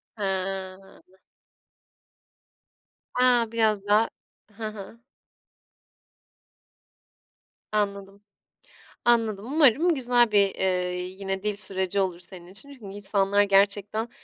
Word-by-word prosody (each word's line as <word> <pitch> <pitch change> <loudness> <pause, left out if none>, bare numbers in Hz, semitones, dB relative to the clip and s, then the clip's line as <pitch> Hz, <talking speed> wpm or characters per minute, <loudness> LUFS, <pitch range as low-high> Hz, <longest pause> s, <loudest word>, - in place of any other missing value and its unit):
He. 190 -1 -5 2.0
A, 245 -2 +3
biraz 215 -3 +1
daha 210 +2 +3 0.5
Hı 220 -1 -4
hı. 215 +2 -11 2.7
Anladım, 200 -1 -3 0.8
anladım 225 -3 +1
umarım 310 +3 +4
güzel 245 -3 +2
bir, 200 -2 +3
eee, 180 -1 -1
yine 190 +1 -5
dil 210 -1 -2
süreci 190 0 -1
olur 180 -2 -2
senin 180 -1 -10
için. 200 +10 -3
Çünkü 255 -6 -15
insanlar 200 0 +2
gerçekten 200 +2 +2
200 Hz, 90 wpm, -25 LUFS, 195-225 Hz, 2.7 s, umarım